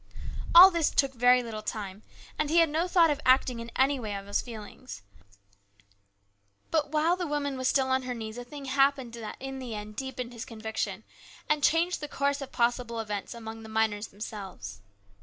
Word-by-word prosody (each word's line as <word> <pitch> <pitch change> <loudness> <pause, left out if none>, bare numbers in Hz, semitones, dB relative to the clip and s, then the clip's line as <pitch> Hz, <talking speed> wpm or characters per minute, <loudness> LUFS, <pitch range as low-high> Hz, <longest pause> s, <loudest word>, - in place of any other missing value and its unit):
All 370 +3 +12
this 335 -3 +2
took 275 -1 +1
very 245 0 +4
little 220 -2 -6
time, 205 -2 -5 0.4
and 305 -1 +1
he 330 - +2
had 330 -2 +6
no 320 +4 0
thought 340 -3 +4
of 295 0 -2
acting 255 -2 +3
in 230 0 -7
any 270 +1 +2
way 215 -4 -4
on 195 0 -6
his 200 0 0
feelings. 210 - -10 1.7
But 310 -3 +1
while 315 +3 +2
the 360 -2 -3
woman 290 -2 -2
was 260 0 -1
still 265 -1 +2
on 260 0 +2
her 255 -1 -4
knees 220 0 -6
a - - -6
thing 280 +3 -9
happened 270 -2 +2
that 225 -2 -7
in 270 0 -6
the 245 -4 -6
end 210 0 -7
deepened 250 -1 -5
his 230 - -6
conviction, 220 -1 -4 0.4
and 300 -1 +1
changed 335 +4 +2
the 295 - -4
course 280 -1 -1
of 275 - -7
possible 235 -1 0
events 210 +1 -4
among 225 -1 -8
the 220 - -10
miners 220 -1 0
themselves. 190 - -8
250 Hz, 195 wpm, -28 LUFS, 220-285 Hz, 1.7 s, All